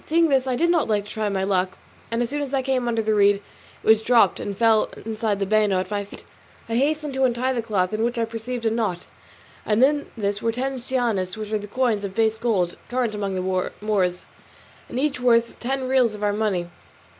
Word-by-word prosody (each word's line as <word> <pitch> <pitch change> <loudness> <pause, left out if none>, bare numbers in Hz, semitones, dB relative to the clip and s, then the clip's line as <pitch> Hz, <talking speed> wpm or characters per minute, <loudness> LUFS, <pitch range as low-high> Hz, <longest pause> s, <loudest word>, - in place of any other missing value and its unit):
Seeing 330 +1 +3
this 265 -2 +2
I 255 - +1
did 340 +7 +2
not 335 -3 +2
like 210 -2 +1
not 205 - -13
to - - -8
try 215 -1 -1
my 195 -1 -1
luck, 190 -1 0 0.3
and 230 +1 0
as 240 - -4
soon 290 0 -2
as 280 -1 -2
I 265 - 0
came 255 -2 0
under 230 -1 0
the 215 0 +1
reed 205 -1 +5
it 200 0 -16
was 220 0 +6
dropped 230 -4 +4
and 200 -1 -5
fell 225 -1 +3 0.2
inside 220 -2 -1
the 195 - 0
bano 210 -2 +2
at 185 - -4
my 205 -1 -1
feet. 200 - -13 0.4
I 230 - -4
hastened 295 +3 0
to 265 0 0
untie 255 +1 +1
the 240 - -1
cloth, 205 -4 -1
in 215 +1 0
which 240 +1 -1
I 230 - +1
perceived 230 +2 -5
a 225 - +3
knot, 210 -6 -1 0.6
and 220 +3 +2
in 290 +1 +2
this 205 -1 -1
were 230 - +1
ten 260 +3 -2
cianis, 235 -7 -1
which 215 -1 -6
are 205 -1 -2
coins 230 -2 0
of 195 -1 -5
base 220 -1 +1
gold, 190 -7 0
current 245 -3 0
among 200 -2 -3
the 185 0 -1
Moors, 190 -4 0 0.6
and 245 - -3
each 280 -2 0
worth 235 -2 +2
ten 260 +1 -2
reals 255 -4 +3
of 210 - -7
our 205 0 +2
money. 205 -5 -1
225 Hz, 235 wpm, -23 LUFS, 205-250 Hz, 0.6 s, was